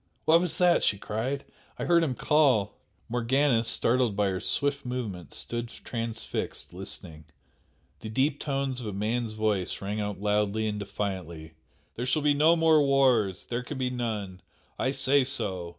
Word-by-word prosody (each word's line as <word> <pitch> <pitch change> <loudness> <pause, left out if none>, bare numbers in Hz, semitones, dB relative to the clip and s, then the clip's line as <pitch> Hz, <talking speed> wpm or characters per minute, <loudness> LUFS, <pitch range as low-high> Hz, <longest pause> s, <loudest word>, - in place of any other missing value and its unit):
"What 165 +2 +6
was 180 -3 0
that?" 175 -1 +4
she 100 - +2
cried 115 +8 -3 0.3
"I - - -3
heard 170 -1 +4
him 135 -6 -1
call!" 135 -11 +3 0.3
Morgana, 120 +1 +2
startled 115 -1 +2
by 100 -1 +2
her 95 -1 -2
swift 140 +5 0
movement, 110 - -5
stood 120 0 -3
transfixed 115 - -5
listening. 80 -1 -8 0.7
The 110 - -7
deep 135 +6 +1
tones 135 -3 -2
of 115 - -5
a 105 - -4
man's 110 +3 -1
voice 110 -4 -1
rang 105 +2 -3
out 105 -2 -4
loudly 105 +1 +1
and 105 -1 -2
defiantly 90 -6 -5 0.4
"There 125 +2 -2
shall 145 +4 +1
be 150 -1 +4
no 155 +4 +5
more 160 -2 +5
wars! 130 -9 +3
There 120 0 -3
can 125 - -7
be 130 -1 -1
none! 105 -7 -4 0.4
I 130 - +1
say 135 +1 +3
so! 95 -9 -2
120 Hz, 165 wpm, -28 LUFS, 105-135 Hz, 0.7 s, What